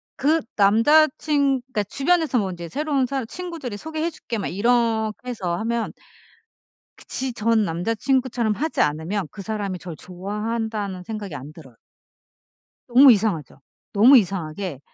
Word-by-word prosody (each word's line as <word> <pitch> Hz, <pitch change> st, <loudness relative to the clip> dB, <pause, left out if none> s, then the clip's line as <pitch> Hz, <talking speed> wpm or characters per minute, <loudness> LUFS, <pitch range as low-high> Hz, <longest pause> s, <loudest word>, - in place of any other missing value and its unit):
그 310 Hz, +3 st, +2 dB
남자 230 Hz, +10 st, +5 dB
친 280 Hz, -4 st, +1 dB
그러니까 215 Hz, -6 st, -1 dB
주변에서 280 Hz, -, +1 dB
뭐 195 Hz, -3 st, -1 dB
이제 175 Hz, -2 st, -7 dB
새로운 280 Hz, -, 0 dB
사람 265 Hz, -2 st, -3 dB
친구들이 330 Hz, -, -6 dB
"소개해 315 Hz, +6 st, -3 dB
줄게." 240 Hz, -8 st, -6 dB
막 -, -, -2 dB
이렇게 225 Hz, +2 st, 0 dB
해서 185 Hz, -8 st, -2 dB
하면 230 Hz, +3 st, -2 dB, 1.1 s
그 -, -, -15 dB
지 260 Hz, -1 st, -3 dB
전 225 Hz, -1 st, +2 dB
남자 175 Hz, +6 st, -1 dB
친구처럼 250 Hz, -2 st, 0 dB
하지 310 Hz, +8 st, -3 dB
않으면 160 Hz, +6 st, -1 dB
그 205 Hz, -, -9 dB
사람이 200 Hz, -3 st, -3 dB
절 170 Hz, -2 st, -8 dB
좋아한다는 205 Hz, +1 st, -4 dB
생각이 205 Hz, -5 st, -6 dB
안 140 Hz, +2 st, -8 dB
들어요. 135 Hz, -7 st, -15 dB, 1.1 s
너무 255 Hz, +2 st, +8 dB
이상하죠. 195 Hz, -, 0 dB, 0.3 s
너무 240 Hz, +7 st, +8 dB
이상하게 180 Hz, -, -2 dB
220 Hz, 320 characters per minute, -23 LUFS, 195-265 Hz, 1.1 s, 너무